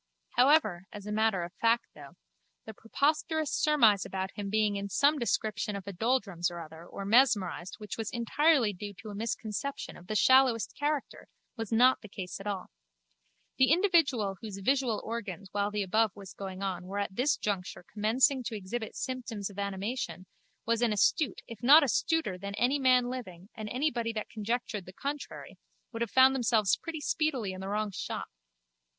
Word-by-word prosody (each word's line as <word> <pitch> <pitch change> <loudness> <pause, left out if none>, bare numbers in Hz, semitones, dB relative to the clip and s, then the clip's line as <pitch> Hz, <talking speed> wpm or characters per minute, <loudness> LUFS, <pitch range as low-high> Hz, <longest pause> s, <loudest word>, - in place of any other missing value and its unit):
However, 245 - +3
as 205 -1 -9
a 210 - -5
matter 215 -4 +1
of 170 - -7
fact 230 +1 +3
though, 145 -2 -13 0.5
the 220 - -8
preposterous 305 +7 0
surmise 230 -10 +4
about 190 0 -4
him 200 -1 -5
being 210 0 +1
in 200 0 -4
some 285 +8 +3
description 215 -3 -1
of 195 - -6
a 200 - -6
doldrums 200 -4 0
or 175 0 -7
other 160 0 -10
or 195 - -7
mesmerised 205 -5 +2
which 210 +1 -7
was 220 - -2
entirely 240 0 +2
due 200 +2 -7
to 215 - -10
a - - -7
misconception 225 +5 -4
of 180 - -14
the 215 - -3
shallowest 260 -1 +4
character, 290 -1 -3 0.3
was 225 -3 -5
not 250 +3 +5
the 215 - -11
case 185 -2 -6
at 195 - -7
all. 200 -2 -4 0.9
The 260 +1 +5
individual 315 - +3
whose 210 -3 -6
visual 250 +2 +1
organs 200 -4 -5
while 205 0 0
the 210 -1 -1
above 215 +1 +1
was 195 -3 -10
going 190 -1 -6
on 185 -2 -3
were 200 +2 -5
at 200 -1 -2
this 260 +6 +2
juncture 190 -3 -3
commencing 250 +5 +2
to 225 - -3
exhibit 215 +3 -5
symptoms 230 -6 -4
of 200 - -9
animation 200 -2 -3 0.4
was 230 0 +1
as 240 - +3
astute 280 - +1
if 230 -2 -10
not 290 +6 +8
astuter 285 - 0
than 200 +1 -5
any 255 +6 +2
man 255 -2 +4
living 200 -7 -7
and 215 -2 -6
anybody 245 -3 -1
that 215 -1 -4
conjectured 220 -3 -3
the 185 - -10
contrary 285 +7 -6 0.3
would 230 -1 -6
have 235 - 0
found 260 +3 +6
themselves 230 -5 +2
pretty 325 -2 -6
speedily 275 -11 0
in 185 0 -7
the 190 - -5
wrong 210 0 -1
shop. - - -5
220 Hz, 180 wpm, -30 LUFS, 200-255 Hz, 0.9 s, not